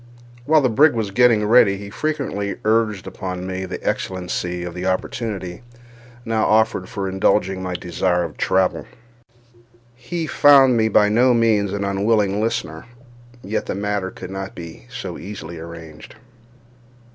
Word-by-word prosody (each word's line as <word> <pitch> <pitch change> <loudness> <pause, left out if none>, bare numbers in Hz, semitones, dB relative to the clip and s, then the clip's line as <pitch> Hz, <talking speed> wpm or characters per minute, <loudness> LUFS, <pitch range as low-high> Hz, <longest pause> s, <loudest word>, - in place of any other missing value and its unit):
While 155 +2 +4
the 130 - +3
brig 145 +6 +4
was 110 -3 -2
getting 115 -1 +4
ready, 105 -3 +5
he 100 0 -9
frequently 125 -8 -3
urged 110 -3 +1
upon 90 -1 -6
me 95 0 -4
the 90 - -7
excellency 90 -1 -3
of 90 -1 -6
the 90 +1 -4
opportunity 95 -1 -3 0.6
now 110 -1 0
offered 110 -4 +2
for 100 -1 -4
indulging 95 0 +1
my 90 -1 -4
desire 90 0 0
of 80 -3 -6
travel. 95 -1 0 1.1
He 165 +6 -4
found 140 -4 +6
me 110 -1 +2
by 105 -1 +4
no 120 +3 +4
means 110 -4 +2
an 100 0 -2
unwilling 100 +1 +1
listener—yet 120 +2 -5
the - - -3
matter 100 -1 -2
could 90 0 -9
not 95 0 -6
be 80 -8 -10
so - - -7
easily 85 -4 -8
arranged. 80 -2 -11
100 Hz, 145 wpm, -21 LUFS, 95-115 Hz, 1.1 s, found